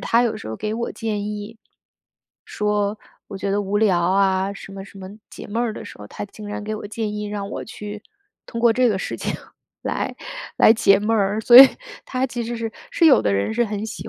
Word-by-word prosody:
她 235 Hz, +1 st, +2 dB
有 235 Hz, -, +1 dB
的 -, -, -6 dB
时 110 Hz, -, -8 dB
候 110 Hz, -, -5 dB
给 215 Hz, 0 st, -3 dB
我 235 Hz, +1 st, -3 dB
建 210 Hz, -3 st, -3 dB
议， 210 Hz, +2 st, -6 dB, 0.9 s
说 210 Hz, 0 st, -1 dB, 0.3 s
我 200 Hz, -, -7 dB
觉 195 Hz, -, -2 dB
得 205 Hz, +1 st, +1 dB
无 200 Hz, +1 st, -1 dB
聊 200 Hz, -5 st, +3 dB
啊， 190 Hz, +2 st, +2 dB
什 195 Hz, 0 st, -11 dB
么 195 Hz, 0 st, -8 dB
什 195 Hz, -, -14 dB
么 190 Hz, 0 st, -8 dB, 0.2 s
解 -, -, -9 dB
闷 230 Hz, +3 st, -1 dB
儿 230 Hz, -2 st, -1 dB
的 -, -, -8 dB
时 -, -, -11 dB
候， 105 Hz, -, -9 dB
她 -, -, -6 dB
竟 210 Hz, +1 st, -11 dB
然 210 Hz, -, -5 dB
给 215 Hz, +1 st, -3 dB
我 210 Hz, -, -7 dB
建 215 Hz, -1 st, -3 dB
议， 210 Hz, 0 st, -4 dB
让 205 Hz, -1 st, -4 dB
我 -, -, -5 dB
去 210 Hz, -1 st, -8 dB, 0.4 s
通 230 Hz, -, -5 dB
过 235 Hz, -1 st, +5 dB
这 250 Hz, +1 st, +3 dB
个 200 Hz, -4 st, 0 dB
事 -, -, -4 dB
情 -, -, -3 dB, 0.5 s
来 -, -, -3 dB, 0.4 s
来 220 Hz, -, +7 dB
解 195 Hz, -3 st, +4 dB
闷 215 Hz, +2 st, 0 dB
儿。 200 Hz, 0 st, +1 dB
所 240 Hz, +2 st, +7 dB
以 270 Hz, -, +12 dB, 0.4 s
它 255 Hz, 0 st, -1 dB
其 240 Hz, -1 st, -4 dB
实 235 Hz, +1 st, -4 dB
是 225 Hz, -1 st, -4 dB, 0.2 s
是 -, -, +1 dB
有 285 Hz, -, +7 dB
的 100 Hz, -, +1 dB
人 100 Hz, -, 0 dB
是 240 Hz, -, +2 dB
很 210 Hz, 0 st, -4 dB
喜 -, -, -7 dB
210 Hz, 255 characters per minute, -22 LUFS, 200-225 Hz, 0.9 s, 以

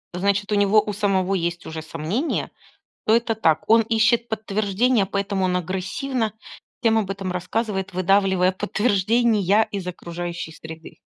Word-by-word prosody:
Значит 200 Hz, +2 st, 0 dB
у -, -, +3 dB
него 205 Hz, +1 st, +4 dB
у 210 Hz, 0 st, -4 dB
самого 195 Hz, -2 st, +1 dB
есть 170 Hz, -2 st, -2 dB
уже 160 Hz, 0 st, -6 dB
сомнения, 165 Hz, -, -3 dB, 0.5 s
то 220 Hz, -, +4 dB
это 230 Hz, -1 st, +1 dB
так. 160 Hz, -8 st, +2 dB
Он 225 Hz, 0 st, +7 dB
ищет 230 Hz, +1 st, +2 dB
подтверждения, 215 Hz, +1 st, +1 dB
поэтому 200 Hz, -1 st, -1 dB
он 180 Hz, -1 st, +1 dB
агрессивно 195 Hz, +7 st, -2 dB, 0.5 s
всем 225 Hz, -2 st, +4 dB
об 200 Hz, -3 st, -2 dB
этом 195 Hz, -1 st, -4 dB
рассказывает, 190 Hz, +2 st, -2 dB
выдавливая 190 Hz, 0 st, +3 dB
подтверждения 210 Hz, +1 st, +2 dB
из 195 Hz, -3 st, -5 dB
окружающей 175 Hz, -1 st, -5 dB
среды. 160 Hz, 0 st, -11 dB
200 Hz, 140 wpm, -23 LUFS, 180-220 Hz, 0.5 s, Он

